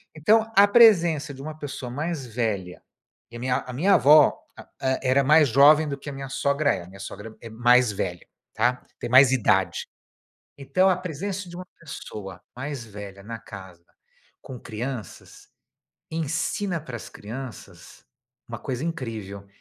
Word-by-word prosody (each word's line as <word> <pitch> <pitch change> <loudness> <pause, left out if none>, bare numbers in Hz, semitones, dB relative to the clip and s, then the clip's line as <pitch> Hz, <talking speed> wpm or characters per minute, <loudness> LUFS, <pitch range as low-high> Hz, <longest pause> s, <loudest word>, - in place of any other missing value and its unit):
Então, 220 +8 +3
a 200 +1 +7
presença 170 -10 +5
de 135 - -11
uma 155 +2 -7
pessoa 135 -4 -6
mais 150 +2 -4
velha, 105 -6 -3 0.5
e - - -12
a - - -9
minha 125 0 0
a 125 - -6
minha 190 +10 +2
avó, 150 +1 +6 0.2
ah - - -13
eh, 130 0 0
era 130 +2 +3
mais 150 0 +5
jovem 150 +5 +6
do 140 - -4
que 145 - -9
a - - -6
minha 135 -1 -7
sogra 140 +2 +1
é, - - -7
a 85 - -14
minha 95 +1 -14
sogra 105 +3 -9
é 115 - -9
mais 120 +1 +3
velha, 90 -3 -5 0.3
tá, 125 +3 +1 0.2
tem 120 - -5
mais 130 +1 +7
idade. 130 -5 +1 0.7
Então, 140 +8 +2
a 180 - +2
presença 185 +2 -5
de 175 - -10
uma 185 - -7 0.2
pessoa 95 - -9 0.2
mais 135 -2 -5
velha, 100 -2 -10
na 115 +3 -7
casa 95 -6 -12 0.6
com 125 -3 -9
crianças, 120 +1 -7 0.6
ensina 165 +4 -2
para 130 -5 -10
as - - -9
crianças 120 +4 -10 0.4
uma 115 - -6
coisa 130 +5 -4
incrível, 110 - -6
130 Hz, 165 wpm, -24 LUFS, 115-155 Hz, 0.7 s, a